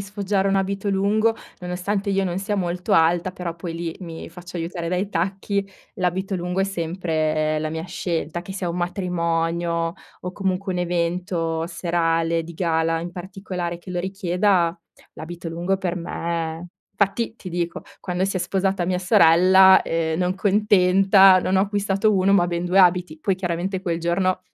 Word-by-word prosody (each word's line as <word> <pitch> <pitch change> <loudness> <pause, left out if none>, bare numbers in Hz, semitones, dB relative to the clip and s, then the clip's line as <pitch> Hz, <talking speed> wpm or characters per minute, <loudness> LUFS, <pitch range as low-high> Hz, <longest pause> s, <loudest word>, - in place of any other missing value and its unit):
sfoggiare 200 0 -1
un 195 - +2
abito 195 +1 -1
lungo, 210 +3 +2 0.2
nonostante 185 +3 -2
io 195 0 +1
non 180 -1 -2
sia 205 +2 -2
molto 180 -2 -2
alta, 170 +2 +3
però 180 -2 -5
poi 165 0 -6
lì 165 -1 -4
mi 165 -3 -8
faccio 175 +1 -10
aiutare 170 +1 -4
dai 180 +3 -1
tacchi 195 +2 -2 0.3
l'abito 190 0 -1
lungo 180 +1 -2
è - - +3
sempre 160 -4 -1
la 155 0 -2
mia 160 +1 -4
scelta, 175 -2 -3
che 190 - -8
sia 190 -2 -3
un 170 - -3
matrimonio 170 -2 -1 0.3
o 180 - -5
comunque 190 0 -2
un 180 - -2
evento 170 -1 -1
serale 165 -1 0
di 170 - -9
gala 165 -1 0
in 175 +1 -5
particolare 180 -1 -5
che 175 - -11
lo 180 - -2
richieda, 180 -1 +1 0.4
l'abito 165 +1 -7
lungo 175 +4 -1
per 185 -2 -2
me 170 0 -4 0.3
fatti 205 +3 0
ti 190 - -9
dico, 175 -1 -3 0.2
quando 180 0 -2
si 195 0 -1
è - - +1
sposata 190 0 0
mia 180 0 0
sorella, 185 +2 +6
ehm, 160 -1 -1
non 180 +1 0
contenta, 195 -1 +5
non 185 +1 0
ho - - +4
acquistato 205 +1 +1
1, 190 +1 +3
ma 180 -3 +4
ben 175 0 -2
2 180 +2 +2
abiti. 180 -3 +3
Poi 195 +2 +1
chiaramente 180 +1 -3
quel 170 -3 -1
giorno 185 +2 0
180 Hz, 170 wpm, -22 LUFS, 170-195 Hz, 0.4 s, sorella